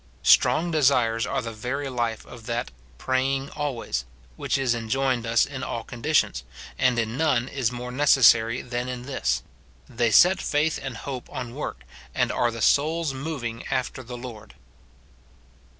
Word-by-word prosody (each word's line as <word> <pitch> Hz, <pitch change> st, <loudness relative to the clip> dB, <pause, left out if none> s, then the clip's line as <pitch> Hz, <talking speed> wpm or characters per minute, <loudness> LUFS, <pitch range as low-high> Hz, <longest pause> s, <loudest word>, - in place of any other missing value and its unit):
Strong 170 Hz, +2 st, +4 dB
desires 125 Hz, -6 st, +2 dB
are -, -, -1 dB
the 115 Hz, -1 st, -5 dB
very 130 Hz, +6 st, -3 dB
life 120 Hz, -4 st, -2 dB
of 115 Hz, -2 st, -12 dB
that 120 Hz, -, -2 dB, 0.3 s
"praying 135 Hz, -, -1 dB
always" 130 Hz, -, -3 dB, 0.3 s
which -, -, -1 dB
is 130 Hz, -3 st, +1 dB
enjoined 120 Hz, +1 st, -1 dB
us 115 Hz, 0 st, +4 dB
in 135 Hz, -2 st, -7 dB
all 115 Hz, -3 st, -4 dB
conditions, 135 Hz, +7 st, 0 dB, 0.4 s
and 125 Hz, -2 st, +3 dB
in 115 Hz, +1 st, -1 dB
none 135 Hz, -6 st, +2 dB
is 130 Hz, -4 st, -1 dB
more 125 Hz, 0 st, -6 dB
necessary 125 Hz, -4 st, +4 dB
than 120 Hz, 0 st, -3 dB
in 125 Hz, -1 st, -5 dB
this; 65 Hz, -, -1 dB, 0.4 s
they 115 Hz, 0 st, 0 dB
set 180 Hz, -, +6 dB
faith 150 Hz, +2 st, 0 dB
and 135 Hz, -4 st, -5 dB
hope 130 Hz, -3 st, -6 dB
on 120 Hz, -2 st, -6 dB
work, 130 Hz, -, -5 dB, 0.3 s
and -, -, +1 dB
are 120 Hz, -, +1 dB
the 115 Hz, -2 st, -4 dB
soul's 155 Hz, +3 st, +2 dB
moving 130 Hz, -5 st, -5 dB
after 130 Hz, 0 st, -2 dB
the 125 Hz, 0 st, -8 dB
Lord. 110 Hz, -, -10 dB
125 Hz, 155 wpm, -25 LUFS, 115-135 Hz, 0.4 s, set